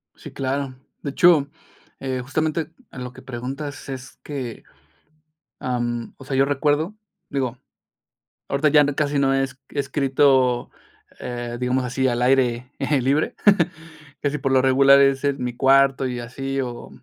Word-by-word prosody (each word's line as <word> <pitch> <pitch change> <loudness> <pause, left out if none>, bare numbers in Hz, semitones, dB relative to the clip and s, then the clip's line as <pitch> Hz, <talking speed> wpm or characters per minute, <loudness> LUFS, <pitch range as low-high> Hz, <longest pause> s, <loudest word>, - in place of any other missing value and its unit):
Sí, - - -11
claro. 135 0 -3 0.3
De 140 - -4
hecho, 160 -3 +5 0.5
eh, 130 -1 -3
justamente 155 +3 -1 0.2
en 125 - -7
lo 125 0 -7
que - - -13
preguntas 135 +3 -6
es 130 -1 -8
que, 130 -6 -6 1.0
am, 120 -2 -2
o 135 - -13
sea, 135 -1 -2
yo 135 - +5
recuerdo, 145 +6 0 0.4
digo 130 -3 -2 0.9
ahorita 140 +2 +2
ya 145 -1 +6
casi 145 -1 0
no 135 -1 +3
es 135 -1 -1
he 145 - -4
escrito, 135 -3 +2 0.5
eh, 120 -1 -5
digamos, 125 +1 0
así 130 +2 0
al 120 -1 0
aire 125 0 +2 0.3
libre. 140 +5 +1 0.9
Casi 145 +1 0
por 135 -1 -1
lo 130 -1 +5
regular 135 +1 +6
es 135 0 +3
en 140 -3 0
mi 125 -1 -3
cuarto 135 0 +4
y 125 -1 -4
así 135 +3 -3
o, 120 -2 -6
135 Hz, 150 wpm, -22 LUFS, 125-140 Hz, 1.0 s, ya